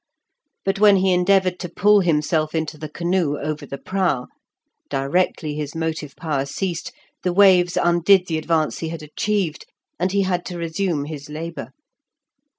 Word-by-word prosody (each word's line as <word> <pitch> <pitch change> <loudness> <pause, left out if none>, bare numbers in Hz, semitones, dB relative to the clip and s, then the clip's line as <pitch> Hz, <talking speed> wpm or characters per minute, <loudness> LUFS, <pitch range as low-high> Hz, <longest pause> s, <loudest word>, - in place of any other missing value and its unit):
But 195 0 0
when 205 -1 +7
he 190 -1 +3
endeavoured 185 0 +2
to 180 - -5
pull 210 +4 +4
himself 155 -2 +1
into 160 -1 -2
the 155 0 -7
canoe 170 -2 0
over 155 +1 -4
the 140 - -6
prow, 180 -8 -1 0.6
directly 150 +3 0
his 150 0 -5
motive 160 -3 -3
power 145 -4 -2
ceased, 175 +2 -3 0.3
the 180 - 0
waves 180 -2 +5
undid 175 +2 +4
the 160 -3 -2
advance 155 -1 0
he 165 - -3
had 165 -2 -6
achieved, 180 +2 -2 0.3
and 180 +1 +1
he 200 0 +2
had 180 -2 -1
to 175 - -6
resume 165 -2 -1
his 150 -1 -8
labour. 165 +2 -6
170 Hz, 155 wpm, -22 LUFS, 155-185 Hz, 0.6 s, when